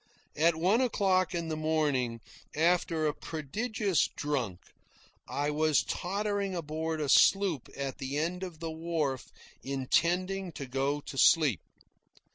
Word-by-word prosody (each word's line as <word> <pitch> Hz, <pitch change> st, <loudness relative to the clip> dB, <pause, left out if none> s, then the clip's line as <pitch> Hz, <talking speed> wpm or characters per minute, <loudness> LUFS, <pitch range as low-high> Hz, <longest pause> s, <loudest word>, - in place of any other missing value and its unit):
At 165 Hz, +2 st, +3 dB
one 185 Hz, +9 st, +2 dB
o'clock 190 Hz, -7 st, +1 dB
in 170 Hz, -1 st, -2 dB
the 155 Hz, -, -1 dB
morning, 145 Hz, -7 st, 0 dB, 0.3 s
after 165 Hz, 0 st, +2 dB
a 150 Hz, -, +1 dB
prodigious 195 Hz, -, -1 dB
drunk, 125 Hz, -11 st, -3 dB, 0.7 s
I 145 Hz, +1 st, -1 dB
was 155 Hz, 0 st, +2 dB
tottering 200 Hz, +1 st, -2 dB
aboard 160 Hz, 0 st, -3 dB
a 150 Hz, -, -1 dB
sloop 185 Hz, -1 st, +4 dB
at 135 Hz, -1 st, -4 dB
the 135 Hz, +2 st, -3 dB
end 170 Hz, +4 st, -1 dB
of 180 Hz, -4 st, -7 dB
the 165 Hz, -1 st, -4 dB
wharf, 160 Hz, -5 st, -2 dB, 0.3 s
intending 175 Hz, +7 st, 0 dB
to 140 Hz, -, -6 dB
go 135 Hz, +3 st, -1 dB
to 140 Hz, -, -9 dB
sleep. 145 Hz, -, +5 dB
160 Hz, 130 wpm, -30 LUFS, 145-180 Hz, 0.7 s, sleep